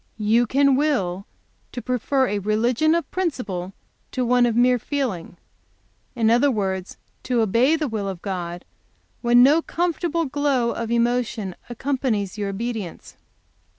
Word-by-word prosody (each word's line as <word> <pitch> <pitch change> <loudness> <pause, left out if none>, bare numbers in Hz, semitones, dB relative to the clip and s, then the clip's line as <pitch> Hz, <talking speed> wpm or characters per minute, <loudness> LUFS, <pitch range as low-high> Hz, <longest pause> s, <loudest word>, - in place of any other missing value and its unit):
"You 225 +3 +2
can 275 +2 +3
will 200 -10 0 0.5
to - - -4
prefer 255 +2 0
a 205 -4 -1
religion 235 - +2
of 340 - -2
principle 215 - -3 0.4
to 255 - -1
one 245 0 +4
of 230 - -1
mere 250 +1 +4
feeling; 230 - -3 0.8
in 225 -2 +2
other, 245 +5 +4
words, 190 -5 -2 0.2
to 245 -2 0
obey 230 +8 +3
the 310 -2 -1
will 215 -4 -3
of 185 -3 -7
God 175 -3 -4 0.6
when 240 0 +5
no 295 +5 +5
comfortable 335 -1 -1
glow 275 -4 0
of 230 -1 -4
emotion 235 -4 0 0.2
accompanies 240 -6 -2
your 205 -2 -3
obedience. 215 -3 -5
240 Hz, 140 wpm, -23 LUFS, 205-270 Hz, 0.8 s, when